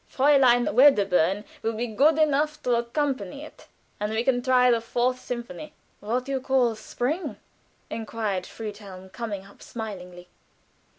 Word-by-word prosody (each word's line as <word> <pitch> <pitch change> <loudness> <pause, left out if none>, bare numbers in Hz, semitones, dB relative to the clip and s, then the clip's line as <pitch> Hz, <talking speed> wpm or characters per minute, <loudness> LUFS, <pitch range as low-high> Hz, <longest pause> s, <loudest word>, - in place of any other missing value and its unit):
Fräulein 260 -3 +4
Wedderburn 205 - +4 0.2
will 225 - -1
be 225 +2 -2
good 280 +8 +3
enough 305 0 +2
to 250 - +1
accompany 260 +1 -2
us, - - -16 0.3
and 210 +1 -2
we 220 +1 0
can 245 -1 +1
try 250 -1 +4
the 230 -1 +2
Fourth 245 +2 0
Symphony." 255 +5 -7 0.3
"What 245 +5 -2
you 270 -1 -2
call 255 -3 +2
'Spring'?" 255 - -3 0.5
inquired 215 -4 -3
Helfen, 200 -4 -9
coming 205 -4 -5
up 200 - -18
smilingly. 180 -6 -8
240 Hz, 135 wpm, -25 LUFS, 210-265 Hz, 0.5 s, Fräulein